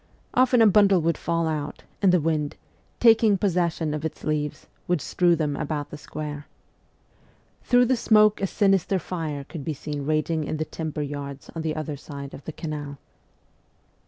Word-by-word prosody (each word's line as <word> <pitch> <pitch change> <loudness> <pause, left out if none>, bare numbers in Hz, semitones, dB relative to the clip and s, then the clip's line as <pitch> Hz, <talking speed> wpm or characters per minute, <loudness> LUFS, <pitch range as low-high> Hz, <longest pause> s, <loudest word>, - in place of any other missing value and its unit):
Often 250 -2 +5
a - - +7
bundle 200 -2 +5
would 165 +1 +1
fall 165 -1 -1
out, 150 -2 -4 0.2
and 195 -2 +5
the 180 - +4
wind, 155 -2 -1 0.4
taking 225 -3 +5
possession 175 -5 0
of 150 0 -4
its 160 - -5
leaves, 150 -1 -2 0.2
would 175 -2 +2
strew 175 +3 +2
them 150 -3 -1
about 145 0 -3
the - - -6
square. 150 -1 -6 1.1
Through 245 0 +4
the 260 +2 +2
smoke 215 -3 +4
a 195 - +1
sinister 195 -1 +2
fire 160 -5 -4
could 145 +1 -8
be 155 0 -3
seen 145 0 -5
raging 155 +1 0
in 155 - -3
the 155 - -2
timber 155 -1 -4
yards 140 -1 -6
on 165 - -4
the 160 -1 -2
other 155 -2 -4
side 140 -1 -8
of 135 - -10
the - - -4
canal. 150 -3 -6
160 Hz, 175 wpm, -25 LUFS, 150-185 Hz, 1.1 s, a